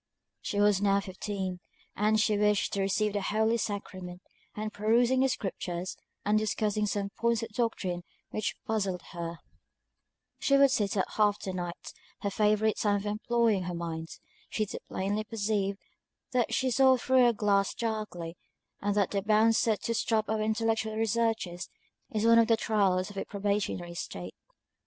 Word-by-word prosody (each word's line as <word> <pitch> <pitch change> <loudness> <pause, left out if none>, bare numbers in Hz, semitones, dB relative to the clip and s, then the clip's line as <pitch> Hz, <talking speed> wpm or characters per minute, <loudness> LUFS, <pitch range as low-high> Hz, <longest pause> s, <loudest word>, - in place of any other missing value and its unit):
She 205 - -2
was 205 -1 +4
now 200 -1 +3
fifteen, 190 -1 -4 0.4
and 215 +1 +2
she 215 0 +3
wished 210 -1 +2
to 200 - 0
receive 200 +2 +1
the 205 - -1
holy 220 +3 +1
sacrament; 185 -4 -5 0.3
and 215 0 -4
perusing 235 +4 +3
the 265 0 +4
scriptures, 185 -6 -3 0.3
and 210 +1 +3
discussing 215 0 0
some 200 -1 -2
points 235 0 0
of 230 - -5
doctrine 210 -6 -1 0.3
which 215 - -2
puzzled 195 -5 -1
her, 170 -1 -5 1.0
she 275 - +3
would 275 -1 +6
sit 205 -6 0
up 190 - +1
half 210 -1 +3
the 190 - -4
night, 175 -1 -5 0.3
her 200 - -1
favourite 215 +1 +2
time 205 -1 +2
for 205 - -3
employing 215 -2 +1
her 175 -1 -3
mind; 165 -1 -4 0.4
she 215 - 0
too - - -6
plainly 205 +3 -1
perceived 205 -2 -1 0.5
that 250 -3 +1
she 260 -1 +1
saw 260 +1 +5
through 255 0 +4
a - - +5
glass 200 -3 +1
darkly; 210 -7 -3 0.5
and 205 0 0
that 200 -3 +2
the 200 - 0
bounds 220 +2 +4
set 220 -3 +1
to 230 - 0
stop 220 -1 +1
our 220 -1 0
intellectual 220 0 0
researches, 220 -5 0 0.4
is 215 0 -1
one 230 0 +7
of 230 - +4
the 225 -1 +4
trials 200 -4 +1
of 200 - -12
a - - -2
probationary 200 -4 -2
state. 90 - -6
210 Hz, 165 wpm, -29 LUFS, 195-220 Hz, 1.0 s, one